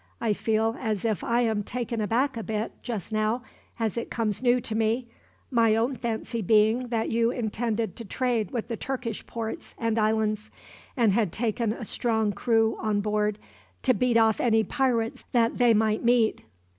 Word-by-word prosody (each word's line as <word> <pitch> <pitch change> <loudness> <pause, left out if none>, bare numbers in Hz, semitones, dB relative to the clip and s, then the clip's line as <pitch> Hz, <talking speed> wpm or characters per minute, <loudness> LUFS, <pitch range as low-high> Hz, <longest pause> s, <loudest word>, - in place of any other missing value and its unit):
I 225 -3 +1
feel 220 +2 0
as 215 -4 -2
if 215 -4 0
I 235 +1 +2
am 220 -3 +1
taken 235 +1 -3
aback 245 +6 +1
a 230 - -3
bit, 220 0 -3
just 220 -4 -5
now, 215 +3 0 0.4
as 225 -1 -1
it 235 - -3
comes 220 -3 -1
new 250 0 +4
to 225 - -4
me 225 +3 0 0.4
my 230 -3 +4
own 235 +4 +1
fancy 230 0 -3
being 220 +4 +3
that 230 -2 -1
you 230 0 +2
intended 230 -1 -2
to 230 - -7
trade 230 -2 -1
with 235 -3 -3
the 235 - -3
Turkish 250 -4 -4
ports 225 -1 -6
and 230 -1 0
islands, 215 0 0 0.5
and 230 -4 +4
had 210 -5 +1
taken 230 +1 -1
a 230 +1 -5
strong 220 -1 0
crew 225 -1 +2
on 210 -2 +1
board 210 0 0 0.5
to 255 - +4
beat 240 +2 +2
off 220 -1 +3
any 225 -2 +3
pirates 240 -4 0
that 235 0 +2
they 245 -1 +5
might 215 0 +2
meet." 235 -2 +2
225 Hz, 180 wpm, -26 LUFS, 215-235 Hz, 0.5 s, they